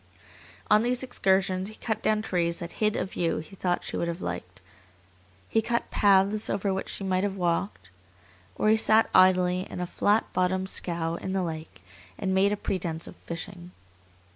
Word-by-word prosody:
On 210 0 +5
these 245 +2 +1
excursions 190 -5 +1
he 215 - -11
cut 220 -1 -3
down 215 0 +1
trees 170 -4 0
that 170 0 -6
hid 215 -1 +2
a - - 0
view 175 -3 -1
he 160 +5 -8
thought 180 -2 -1
she - - -5
would 170 - -1
have 170 +1 -3
liked, 90 - -6 0.9
he 225 - +2
cut 235 +1 -2
paths 200 +1 +3
over 195 0 0
which 190 - -4
she - - -5
might 185 0 0
have 200 -1 -1
walked. 170 - -2 0.6
Or 215 - +1
he 220 - +5
sat 220 0 +4
idly 185 0 +4
in - - -6
a 180 - -1
flat 205 +4 +2
bottomed 185 +1 0
scow 170 -1 -1
in 190 - -4
the 190 -1 0
lake 160 -2 -6 0.3
and 190 -1 -1
made 195 +2 +3
a 210 - 0
pretence 170 -5 -3
of - - -9
fishing. 175 +1 -8
190 Hz, 185 wpm, -27 LUFS, 175-205 Hz, 0.9 s, On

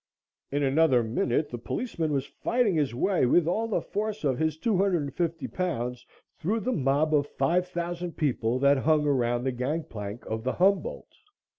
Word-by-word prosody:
In 145 +1 0
another 135 -3 +4
minute 120 +5 0
the 120 - -5
policeman 165 - -3
was 140 -2 0
fighting 235 - 0
his 145 -7 0
way 185 0 +2
with 165 +5 +4
all 220 +6 0
the 225 - -1
force 215 -1 -3
of 135 -3 +1
his 160 -1 0
250 175 - 0
pounds 125 -9 -3 0.3
through 215 +8 0
the 255 - -1
mob 145 - +1
of 145 -1 +3
five 175 +8 +1
thousand 175 0 -4
people 125 -5 0
that 140 +1 +4
hung 150 +2 +2
around 120 -4 +1
the 130 - 0
gang 135 +7 -2
plank 105 -1 -7
of 110 0 -4
the 130 - -1
"Humboldt." 200 - +1
150 Hz, 170 wpm, -27 LUFS, 130-180 Hz, 0.3 s, another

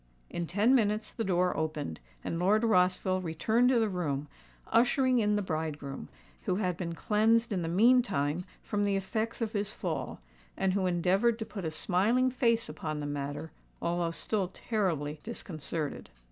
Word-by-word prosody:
In 170 -1 -3
ten 210 +9 +3
minutes 215 -3 +1
the 225 - -2
door 180 -2 +1
opened, 155 - -3 0.2
and 165 - -2
Lord 205 +5 +3
Rossville 185 -3 +3
returned 220 +9 +2
to 255 - +4
the 225 - +2
room, 150 -7 -2 0.4
ushering 255 +1 +3
in 210 -1 +2
the 205 - 0
bridegroom, 155 -5 -4 0.4
who 185 - +1
had 185 -3 0
been 170 -1 -4
cleansed 225 +4 +2
in 185 - 0
the 165 - -2
meantime 180 - +3 0.2
from 205 0 -1
the 200 -1 +2
effects 220 +4 -2
of 220 - -3
his 205 0 -1
fall, - - -4 0.4
and 190 -1 +1
who 190 -1 +1
endeavoured 190 +6 +2
to 220 - -4
put 200 -4 -6
a - - 0
smiling 210 +11 +2
face 230 -2 +2
upon 155 0 -4
the 145 - -3
matter, 145 +2 -4 0.3
although 170 0 0
still 190 +3 -1
terribly 170 -8 -2
disconcerted. 160 -8 -5
185 Hz, 165 wpm, -30 LUFS, 165-220 Hz, 0.4 s, to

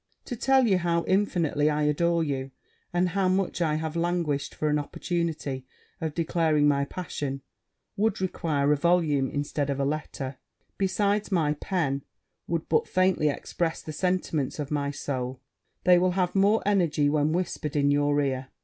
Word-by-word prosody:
To 245 - -4
tell 265 +2 +3
you 195 -5 +3
how 170 -1 +1
infinitely 170 -6 +1
I 150 0 0
adore 170 +3 +2
you, 135 -3 -2 0.4
and 175 +1 +1
how 195 +1 +1
much 185 -1 0
I 155 -3 +2
have 160 0 -3
languished 170 -4 -1
for 155 - -1
an 150 0 +2
opportunity 155 -3 -3 0.4
of 160 -2 -3
declaring 160 -3 +2
my 140 -1 +2
passion, 140 -5 -5 0.5
would 210 0 +1
require 155 -6 0
a - - +3
volume 150 -4 +2
instead 145 0 -2
of 140 0 -1
a 140 - +1
letter: 140 -2 -4 0.4
besides, 200 +2 +1
my 160 -5 +2
pen 150 -4 -1 0.5
would 165 -1 -2
but - - +2
faintly 185 -5 +2
express 165 +3 -2
the 155 - -6
sentiments 175 -5 -1
of 150 -1 -4
my 145 -1 0
soul 130 -2 -4 0.4
they 180 -1 +6
will 180 0 +2
have 180 -1 0
more 200 +3 +3
energy 170 -8 +2
when 150 +1 +2
whispered 165 -4 -2
in 145 -1 +3
your 145 0 +2
ear. 130 -2 -2
155 Hz, 165 wpm, -27 LUFS, 145-180 Hz, 0.5 s, they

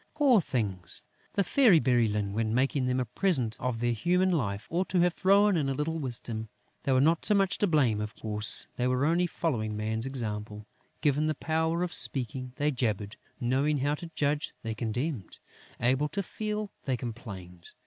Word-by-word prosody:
Poor 275 -8 +5
things! 105 - -2 0.3
The 200 - +2
Fairy 215 - +5
Bérylune, 110 -7 +1
when 110 +1 0
making 130 0 +1
them 125 0 +1
a 125 - 0
present 125 - +1
of 125 -3 -2
their 120 0 +2
human 180 - +2
life, 105 - -1
ought 180 +3 0
to 180 - +2
have 175 -1 +3
thrown 200 +1 +4
in 145 -5 +1
a 135 - -1
little 160 +3 -2
wisdom. 115 -5 -4 0.3
They 135 - -1
were 130 - +4
not 160 +4 +3
so 210 - +3
much 195 -1 +2
to 205 - +3
blame. 130 - +2
Of 105 0 -5
course, 105 -1 +1
they 125 - +1
were 130 +2 +1
only 170 +3 +2
following 110 -12 -2
Man's 110 +3 -1
example. 105 -5 -5 0.4
Given 150 0 +2
the 155 - 0
power 160 +3 0
of 180 - -3
speaking, 130 -1 -1
they 145 +1 +1
jabbered; 110 -5 -2 0.2
knowing 135 +5 +1
how 140 +2 +1
to 165 +3 -6
judge, 145 +1 0
they 110 -1 -3
condemned; 120 - -3 0.4
able 130 +5 +2
to 200 +6 -2
feel, 210 +1 -4
they 130 -3 0
complained. 100 -8 -8
130 Hz, 185 wpm, -29 LUFS, 110-165 Hz, 0.4 s, Poor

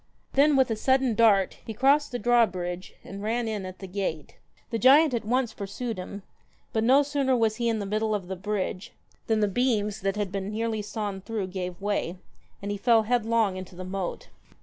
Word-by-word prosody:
Then, 285 +2 +5
with 265 -3 +3
a - - +1
sudden 260 +2 +2
dart, 210 -4 +3
he 220 - -7
crossed 275 +5 +3
the 245 - -2
drawbridge 190 -7 0
and 200 0 -8
ran 230 +2 -1
in 210 -4 -3
at 185 0 -9
the 195 - -8
gate. 185 -5 -4 0.4
The 230 - -1
giant 280 +4 +6
at 235 - -1
once 245 0 0
pursued 210 +2 -5
him; 200 +2 -7 0.5
but 220 - +1
no 265 +5 +5
sooner 275 -3 +1
was 220 -2 +1
he 235 -1 0
in 225 - 0
the 205 - -3
middle 215 +2 0
of 190 -3 -4
the 190 - -4
bridge, 195 -1 -3 0.3
than 220 -1 +2
the 210 - +3
beams 210 -2 0
that 195 +1 0
had 205 -3 -2
been 195 0 -3
nearly 220 0 -2
sawn 205 -2 -4
through 205 -2 -4
gave 180 -1 -5
way, 200 -3 -2 0.5
and 200 - -3
he 205 - -2
fell 225 +1 +4
headlong 225 -3 +1
into 185 -1 -9
the 185 +1 -7
moat. 185 -1 -4
215 Hz, 205 wpm, -27 LUFS, 195-240 Hz, 0.5 s, giant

